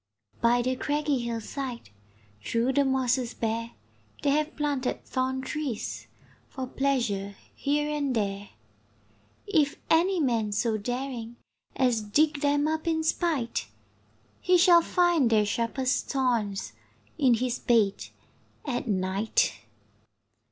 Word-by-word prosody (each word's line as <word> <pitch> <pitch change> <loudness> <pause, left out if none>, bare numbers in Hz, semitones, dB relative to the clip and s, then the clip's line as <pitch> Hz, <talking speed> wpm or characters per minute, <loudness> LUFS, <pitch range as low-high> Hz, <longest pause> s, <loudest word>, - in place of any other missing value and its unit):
By 240 +1 +3
the 255 +1 0
craggy 290 0 0
hill 235 -1 -3
side, 250 - -6 0.5
Through 235 +3 0
the 280 0 +3
mosses 255 -2 0
bare, 230 +1 -2 0.5
They 285 - +3
have 305 +2 0
planted 285 -4 -2
thorn 260 0 -1
trees 270 -4 -4 0.4
For 260 -2 -5
pleasure 240 -8 -1 0.2
here 295 +1 0
and 290 -3 -1
there. 200 -2 -2 1.0
If 310 -8 +1
any 355 +3 +4
man 230 -7 +1
so 220 +2 +1
daring 245 0 -4 0.4
As 250 -4 +2
dig 290 +8 +1
them 290 0 +2
up 315 +1 -2
in 320 -1 +1
spite, 305 - -1 0.7
He 360 0 +4
shall 345 -1 +7
find 345 -7 +2
their 215 -2 +3
sharpest 235 +5 -1
thorns 225 - -1 0.5
In 255 -4 +5
his 245 +1 -2
bed 220 -5 +2 0.6
at 245 -4 -2
night. 195 +1 +1
255 Hz, 120 wpm, -27 LUFS, 230-290 Hz, 1.0 s, shall